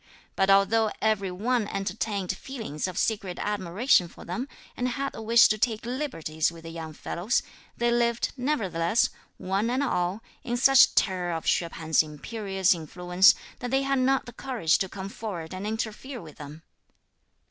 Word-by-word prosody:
But 195 0 +2
although 210 +3 +4
every 215 -3 +1
one 215 +4 0
entertained 195 -1 -2
feelings 215 - -5
of 185 -1 -6
secret 200 -5 -1
admiration 200 0 +2
for - - -13
them, 240 +10 -4 0.3
and 250 - -1
had 275 +3 -3
the - - -7
wish 230 +2 +6
to 215 - 0
take 225 0 0
liberties 200 - -2
with 165 -1 -13
the 165 - -8
young 160 -1 -7
fellows, 180 +9 -1 0.3
they 240 0 +1
lived, 235 -1 +1
nevertheless, 225 - +1 0.3
one 195 +4 -1
and 255 +3 0
all, 180 -3 -1 0.2
in 240 -3 -2
such 270 +2 +6
terror 180 -2 +1
of 165 - -4
Hsüeh 170 - +1
P'an's 160 -1 +2
imperious 190 +5 0
influence, 180 +3 +3 0.2
that 245 - -4
they 270 +2 +1
had 275 -1 +1
not 265 +1 +2
the 240 - -10
courage 235 -11 0
to 190 - -1
come 190 0 -6
forward 190 -6 -6
and 190 +3 -5
interfere 220 +4 -4
with 155 -6 -12
them. 150 +2 -10
200 Hz, 170 wpm, -27 LUFS, 175-240 Hz, 0.3 s, wish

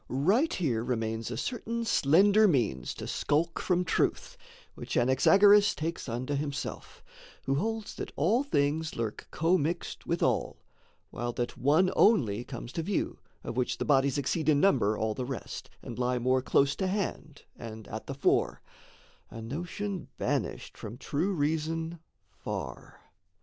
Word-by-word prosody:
Right 195 - +2
here 125 -11 0
remains 115 -2 -2
A 120 - -4
certain 235 - -3
slender 200 +5 +5
means 115 - 0
to - - -7
skulk 165 +3 0
from 180 -1 +1
truth, 165 - 0 0.4
Which - - -4
Anaxagoras 200 +12 +5
takes 160 -3 -4
unto 125 +5 -3
himself, 145 0 -4 0.4
Who 135 - 0
holds 220 +8 -2
that - - -5
all 205 - +2
things 160 - 0
lurk 115 -2 -4
commixed 170 0 -1
with - - 0
all - - 0 0.5
While 120 +1 -3
that 120 0 -3
one 155 +8 +3
only 120 - +4
comes 120 -2 -8
to 165 - -2
view, 190 +4 -2 0.2
of - - -5
which 125 0 0
The - - -2
bodies 135 -1 +3
exceed 155 +3 0
in 145 -2 +4
number 115 - +3
all 110 0 0
the 130 - -4
rest, 130 -1 -6
And - - -7
lie 125 0 +1
more 130 +2 +2
close 140 +2 +2
to 190 - 0
hand 185 -6 -3
and 110 -2 -9
at 110 - -7
the 135 - -4
fore 135 - +1 0.7
A 115 - -9
notion 175 - -4
banished - - -2
from 110 +2 -7
true 150 +8 -1
reason 160 +1 -1 0.3
far. - - -7
145 Hz, 150 wpm, -29 LUFS, 125-180 Hz, 0.7 s, slender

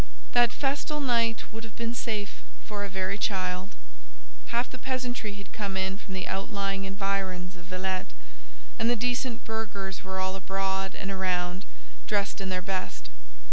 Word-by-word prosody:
That 240 -1 +7
festal 290 +3 +1
night 235 -4 +3
would 225 0 -5
have 225 - -8
been 235 0 0
safe 215 -4 -1 0.2
for 205 -1 -2
a 200 - -2
very 190 +1 0
child. 185 -1 +1 0.7
Half 240 +2 +1
the 255 - -6
peasantry 250 -5 -1
had 200 0 -9
come 200 -3 -1
in 190 0 +2
from 195 -2 -6
the 185 - -1
outlying 195 0 0
environs 195 -2 0
of 175 -1 -11
Villette, 185 0 0 0.7
and 225 - +4
the 240 - +5
decent 245 +1 +1
burghers 200 -4 -2
were 190 0 -2
all 190 0 +1
abroad 195 0 0
and 195 - -2
around, 185 0 +1 0.4
dressed 205 -1 +2
in 190 - -1
their 185 -1 0
best. 185 - -2
195 Hz, 160 wpm, -30 LUFS, 190-225 Hz, 0.7 s, That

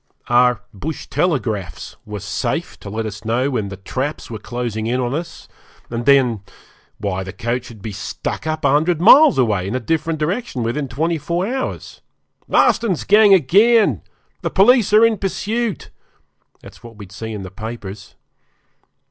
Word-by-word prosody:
Our 120 -2 +3
'bush 145 +10 -6
telegraphs' 115 - -2
were 105 -2 -6
safe 100 0 -3
to - - -9
let 110 +2 -3
us 105 0 -7
know 120 +5 0
when 110 -6 -2
the 95 - -8
'traps' 130 +9 -4
were 110 - -5
closing 115 -1 -4
in 125 +2 0
on 125 0 -1
us, 165 +3 -6 0.4
and 120 +1 -4
then 130 -6 +4 0.6
why 95 -2 -3
the 95 - -7
coach 125 +3 -3
would 110 -4 -13
be 110 - -5
'stuck 105 - -5
up' 155 0 -2
a - - +4
hundred 155 +3 +2
miles 280 - +7
away, 105 -7 +1
in 105 - -3
a - - 0
different 160 +6 -1
direction, 155 - -2
within 135 +5 -2
twenty 160 +6 -1
four 170 +4 -2
hours. 260 +4 -4 0.5
Marston's 210 -7 +2
gang 210 0 +5
again! 195 - +4 0.4
The - - -2
police 215 +1 +4
are 215 +2 +7
in 225 -3 +1
pursuit! 215 +3 -3 0.7
That's - - -14
what 115 -1 -12
we'd 100 -3 -11
see 110 +3 -6
in 105 -3 -6
the 95 - -9
papers. 105 -2 -8
125 Hz, 165 wpm, -19 LUFS, 110-170 Hz, 0.7 s, miles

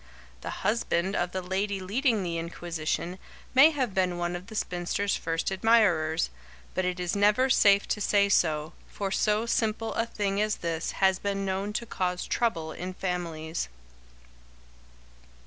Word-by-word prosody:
The - - -6
husband 195 -4 +1
of 175 0 0
the 185 -1 -3
lady 195 +2 -1
leading 220 +3 +1
the 170 -2 -2
inquisition 170 +1 -3 0.3
may 270 +4 +8
have 260 -9 -2
been 185 -2 +1
one 175 0 -2
of 180 +2 -7
the 220 - -9
spinster's 180 +1 -1
first 165 +3 -2
admirers, 190 - +3 0.4
but 185 - 0
it 180 0 -2
is 180 +1 -1
never 210 +6 +3
safe 200 -3 +5
to 210 - -1
say 200 0 +3
so, 155 -4 +1
for 195 -1 -4
so 210 +2 +1
simple 225 -1 0
a 230 - 0
thing 200 -2 -1
as 215 0 +1
this 165 -1 -3
has 190 -1 +3
been 195 -1 -2
known 195 +2 -2
to 235 - -2
cause 180 -4 -2
trouble 165 -10 -1
in 180 +3 -6
families. 165 - -3
190 Hz, 155 wpm, -28 LUFS, 175-210 Hz, 0.4 s, may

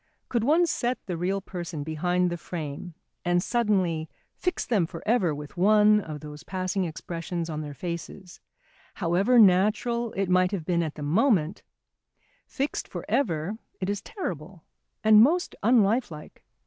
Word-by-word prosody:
Could 235 -3 0
one 320 +7 +4
set 255 -6 -1
the 180 - -3
real 190 +4 -1
person 170 -5 -6
behind 175 +3 0
the 175 - -3
frame 160 0 -6 0.3
and 175 0 +2
suddenly 190 -9 0 0.3
fix 360 -1 -2
them 200 -9 +1
for 165 -1 -9
ever 205 -9 +2
with 150 +3 -9
one 210 +3 +5
of 155 -5 -7
those 150 -1 -9
passing 185 +1 -2
expressions 170 0 -5
on 155 0 -3
their 145 -2 -7
faces, 175 +2 -7 0.6
however 190 +9 +2
natural 220 +4 +4
it 195 -1 -1
might 185 0 +3
have 175 -6 -3
been 170 -1 +1
at 160 -3 -3
the 150 - -6
moment, 185 - +2 0.9
fixed 280 0 -3
for - - -7
ever 200 - -1 0.2
it 190 +1 -1
is 205 - -3
terrible, 180 - -6 0.4
and 215 -1 +7
most 335 +9 +3
unlifelike. 215 -7 +1
185 Hz, 150 wpm, -26 LUFS, 165-215 Hz, 0.9 s, and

